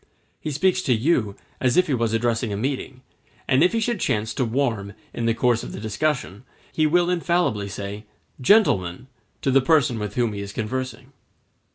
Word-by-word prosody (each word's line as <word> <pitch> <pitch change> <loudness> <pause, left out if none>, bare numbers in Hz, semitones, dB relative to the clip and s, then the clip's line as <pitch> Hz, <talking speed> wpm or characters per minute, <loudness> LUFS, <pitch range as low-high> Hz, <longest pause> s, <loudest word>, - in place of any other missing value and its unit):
He - - -4
speaks 185 +6 +1
to 130 - +2
you 110 -5 +1 0.2
as 125 -2 +2
if 180 - +5
he 145 - -1
was 115 -3 0
addressing 115 0 0
a 100 - -2
meeting; 130 +2 -3 0.4
and 135 +3 +4
if 180 - +4
he 230 - 0
should 225 -1 -1
chance 110 -6 -1
to 130 - 0
warm 115 -5 -1 0.2
in 115 - -2
the 115 - +2
course 120 -1 +2
of - - -8
the - - -6
discussion, 110 -1 -2 0.3
he 155 -1 +2
will 175 +3 +3
infallibly 170 - 0
say, 100 +1 -6 0.4
"Gentlemen," 115 - +3 0.4
to 135 - +2
the 135 +1 +5
person 130 -5 +3
with 105 -1 -5
whom 120 -3 +1
he 100 - -5
is 100 0 -7
conversing. 130 +3 -4
125 Hz, 190 wpm, -23 LUFS, 110-150 Hz, 0.4 s, if